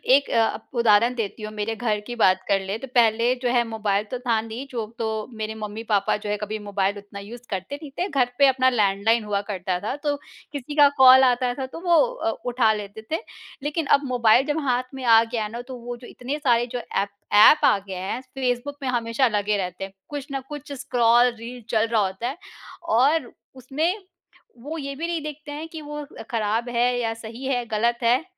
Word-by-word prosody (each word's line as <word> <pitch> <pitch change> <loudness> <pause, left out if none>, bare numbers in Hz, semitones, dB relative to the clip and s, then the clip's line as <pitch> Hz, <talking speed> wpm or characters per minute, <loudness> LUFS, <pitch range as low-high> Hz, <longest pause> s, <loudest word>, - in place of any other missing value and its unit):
एक 280 - +1
अ, - - -1 0.2
अब 220 - -9
उदाहरण 235 +2 +4
देती 215 -1 -4
हूँ, 215 0 -6
मेरे 215 +1 -3
घर 215 -3 -1
की 240 - -5
बात 190 -4 +3
कर 195 -1 +3
लें, 195 +3 -4
तो 270 - -7
पहले 235 +1 +4
जो 245 - +2
है, 240 -1 +4
मोबाइल 210 -2 0
तो 250 - -3
था 235 -3 +1
नहीं, 225 +4 -7
जो 230 -3 -3
तो 220 -1 -2
मेरे 220 0 -4
मम्मी-पापा 210 -1 -1
जो 210 0 -7
है, 210 - 0
कभी 210 +1 -4
मोबाइल 200 -1 -1
उतना 200 0 -10
यूज़ 235 +4 -10
करते 190 +8 -4
नहीं 290 -3 -9
थे, 365 - +1
घर 260 -5 +1
पे 280 - +7
अपना 260 0 +4
लैंडलाइन 215 0 +2
हुआ 200 -1 -1
करता 185 -2 -2
था, 215 +7 -3
तो 290 0 -1 0.4
किसी 290 +1 -6
का 290 -1 +8
कॉल 260 0 +9
आता 250 -1 +2
था, 265 +1 -4
तो 295 +5 -9
वो 345 -2 +3 0.2
अ, 360 - -2 0.2
उठा 240 -3 +3
लेते 210 +1 -7
थे। 320 - +1 0.4
लेकिन 300 +1 -1
अब 285 - -12
मोबाइल 245 0 +4
जब 295 +2 0
हाथ 250 0 +2
में 265 -1 -7
आ 225 -1 +7
गया 225 -2 -3
ना, 235 +3 -6
तो 255 +1 -9
वो 240 0 -7
जो 245 - -12
इतने 270 +4 -5
सारे 240 -4 +3
जो 245 - -2 0.2
एप 200 - +1 0.3
एप 215 +9 +8
आ - - +5
गए 190 - -5
हैं, 190 +7 -4
फेसबुक 260 +2 -1
में 260 - -1
हमेशा 235 +1 +1
लगे 210 -1 0
रहते 180 0 -4
हैं। 195 0 -7 0.2
कुछ 290 -2 -5
ना 270 - -2
कुछ 295 -1 -8
स्क्रॉल 240 -2 +3
रील 240 +2 -8
चल 225 0 +2
रहा 220 -2 +3
होता 190 +6 -4
है, 275 +6 -4 0.5
और 275 0 +2 0.2
उसमें 305 - -1 0.6
वो 310 +5 -5
ये 280 -2 -4
भी 330 +4 -3
नहीं 335 -2 -2
देखते 300 -1 -7
हैं 305 +2 -6
कि 320 -1 -8
वो 295 0 -6 0.2
अ, - - -7
खराब 225 +2 0
है 240 +1 +2
या 225 -1 -1
सही 230 +3 -9
है 270 -1 +1
या 245 - -1
गलत 235 +2 +1
है। 245 +6 +3
240 Hz, 225 wpm, -24 LUFS, 215-265 Hz, 0.6 s, कॉल